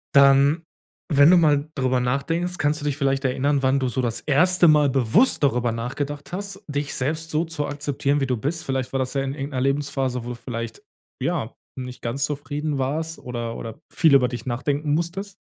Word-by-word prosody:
Dann, 140 Hz, +3 st, +5 dB, 0.5 s
wenn 145 Hz, +2 st, +6 dB
du 180 Hz, -, +7 dB
mal 150 Hz, -2 st, +3 dB
drüber 130 Hz, -2 st, +1 dB
nachdenkst, 165 Hz, +8 st, -1 dB
kannst 150 Hz, 0 st, +1 dB
du -, -, -5 dB
dich 145 Hz, -1 st, -1 dB
vielleicht 135 Hz, -1 st, 0 dB
erinnern, 135 Hz, +2 st, +1 dB
wann 130 Hz, +1 st, +3 dB
du 130 Hz, -, 0 dB
so 125 Hz, +2 st, -1 dB
das 115 Hz, -2 st, -2 dB
1. 175 Hz, +4 st, +4 dB
Mal 150 Hz, -2 st, +5 dB
bewusst 135 Hz, -, +3 dB
darüber 120 Hz, -4 st, +2 dB
nachgedacht 145 Hz, +7 st, -5 dB
hast, 200 Hz, +1 st, -6 dB
dich 145 Hz, 0 st, -3 dB
selbst 155 Hz, +4 st, -2 dB
so 155 Hz, +3 st, 0 dB
zu 160 Hz, -3 st, -3 dB
akzeptieren, 145 Hz, 0 st, -1 dB
wie 135 Hz, -, 0 dB
du 125 Hz, -2 st, 0 dB
bist? 155 Hz, +8 st, -3 dB
Vielleicht 130 Hz, -2 st, -2 dB
war 135 Hz, -, 0 dB
das 130 Hz, -1 st, -2 dB
ja 135 Hz, -1 st, 0 dB
in 135 Hz, 0 st, -3 dB
irgend 140 Hz, +1 st, -5 dB
'ner 130 Hz, -, -1 dB
Lebensphase, 135 Hz, -3 st, -1 dB
wo 120 Hz, -, -6 dB
du 125 Hz, -, -4 dB
vielleicht, 115 Hz, -2 st, -6 dB, 0.4 s
ja, -, -, -2 dB, 0.3 s
nicht 125 Hz, 0 st, -7 dB
ganz 135 Hz, +5 st, -1 dB
zufrieden 145 Hz, 0 st, -3 dB
warst 160 Hz, +5 st, -2 dB
oder 120 Hz, -2 st, -5 dB
oder 115 Hz, +6 st, -7 dB
viel 160 Hz, -4 st, +5 dB
über 125 Hz, -2 st, +5 dB
dich 120 Hz, +1 st, -6 dB
nachdenken 145 Hz, +4 st, -1 dB
musstest? 190 Hz, +4 st, -3 dB
140 Hz, 200 wpm, -23 LUFS, 130-150 Hz, 0.5 s, du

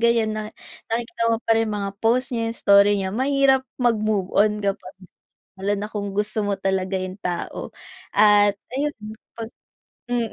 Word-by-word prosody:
ganyan 230 Hz, -2 st, +2 dB
na, 215 Hz, 0 st, -4 dB, 0.4 s
nakikita 230 Hz, 0 st, -3 dB
mo 230 Hz, -, +3 dB
pa -, -, +3 dB
rin 225 Hz, 0 st, +1 dB
mga 205 Hz, -2 st, -2 dB
post 245 Hz, +3 st, +1 dB
niya, 230 Hz, -1 st, -1 dB
yung 230 Hz, -, -5 dB
story 200 Hz, 0 st, +6 dB
niya 190 Hz, -1 st, -2 dB
mahirap 270 Hz, +2 st, +3 dB, 0.2 s
mag-move 215 Hz, -6 st, 0 dB
on 210 Hz, 0 st, +3 dB
kapag 195 Hz, -1 st, -3 dB, 0.6 s
lalo 195 Hz, +2 st, -1 dB
na 210 Hz, -, -4 dB
kung 205 Hz, -2 st, -4 dB
gusto 210 Hz, +1 st, -1 dB
mo 200 Hz, -1 st, 0 dB
talaga 190 Hz, 0 st, 0 dB
yung 185 Hz, 0 st, -5 dB
tao 175 Hz, -1 st, -4 dB, 0.4 s
at 205 Hz, 0 st, +5 dB, 0.2 s
ayun, 295 Hz, +1 st, 0 dB, 1.2 s
mm. 240 Hz, -2 st, -1 dB
210 Hz, 155 wpm, -23 LUFS, 200-230 Hz, 1.2 s, story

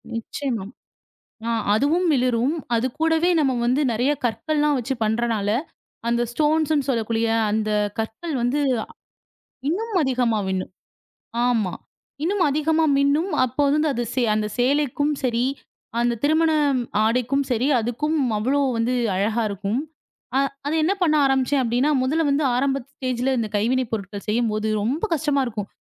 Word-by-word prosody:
நிச்சயமா. 230 Hz, -2 st, -3 dB, 0.8 s
ஆ -, -, 0 dB, 0.2 s
அதுவும் 315 Hz, +10 st, +2 dB
மிளிரும். 250 Hz, +2 st, +1 dB, 0.2 s
அது 230 Hz, +2 st, +1 dB
கூடவே 325 Hz, +2 st, +3 dB
நாம 265 Hz, -4 st, +1 dB
வந்து 255 Hz, +4 st, +2 dB
நிறைய 250 Hz, +6 st, +1 dB
கற்கள் 235 Hz, +7 st, -1 dB
எல்லாம் 295 Hz, -1 st, +3 dB
வைச்சு 250 Hz, +3 st, -2 dB
பண்றதனால், 220 Hz, -2 st, 0 dB, 0.6 s
அந்த 235 Hz, 0 st, +1 dB
ஸ்டோன்ஸ்ன்னு 300 Hz, 0 st, +1 dB
சொல்லக்கூடிய 230 Hz, -2 st, 0 dB, 0.2 s
அந்தக் 210 Hz, -1 st, 0 dB
கற்கள் 225 Hz, +9 st, -4 dB
வந்து 245 Hz, +5 st, +1 dB, 0.2 s
அ -, -, -9 dB, 0.8 s
இன்னும் 425 Hz, +5 st, -2 dB
அதிகமாக 245 Hz, -5 st, +1 dB
மின்னும். 185 Hz, 0 st, -3 dB, 0.8 s
ஆமா 215 Hz, -7 st, +1 dB, 0.5 s
இன்னும் 375 Hz, +1 st, +1 dB
அதிகமாக 310 Hz, +2 st, +2 dB
மின்னும். 290 Hz, +7 st, +2 dB
அப்போ 255 Hz, +4 st, -3 dB
வந்து 305 Hz, 0 st, +2 dB
அது 240 Hz, -, -1 dB, 0.3 s
அந்தச் 210 Hz, -1 st, -2 dB
சேலைக்கும் 285 Hz, +2 st, +1 dB
சரி 240 Hz, 0 st, +1 dB, 0.5 s
அந்தத் 235 Hz, -1 st, 0 dB
திருமண 315 Hz, +2 st, +3 dB, 0.5 s
ஆடைக்கும் 250 Hz, +4 st, +1 dB
சரி 245 Hz, +2 st, +1 dB
அதுக்கும் 270 Hz, +8 st, -1 dB, 0.2 s
அவ்வளவு 270 Hz, +6 st, +1 dB
வந்து 235 Hz, +2 st, 0 dB, 0.2 s
அழகாக 215 Hz, +4 st, 0 dB
இருக்கும். 200 Hz, +5 st, -2 dB, 0.6 s
அ -, -, +4 dB, 0.3 s
அதை 305 Hz, -, 0 dB
என்ன 365 Hz, +5 st, +2 dB
பண்ண 310 Hz, -3 st, +3 dB
ஆரம்பித்தேன் 270 Hz, +1 st, +2 dB
அப்படி 235 Hz, +1 st, 0 dB
என்றால், 290 Hz, -2 st, +2 dB
முதலில் 305 Hz, +4 st, +1 dB
வந்து 285 Hz, +2 st, +1 dB
ஆரம்ப 270 Hz, +2 st, +1 dB, 0.3 s
நிலையில் 255 Hz, +1 st, 0 dB
இந்த 220 Hz, -2 st, -2 dB
கைவினை 250 Hz, +4 st, +1 dB
பொருட்கள் 200 Hz, -1 st, -4 dB
செய்யும்போது 215 Hz, -1 st, 0 dB, 0.2 s
ரொம்ப 270 Hz, +9 st, -1 dB
கஷ்டமாக 290 Hz, -3 st, +1 dB
இருக்கும். 210 Hz, -3 st, -5 dB
255 Hz, 140 wpm, -23 LUFS, 225-295 Hz, 0.8 s, அ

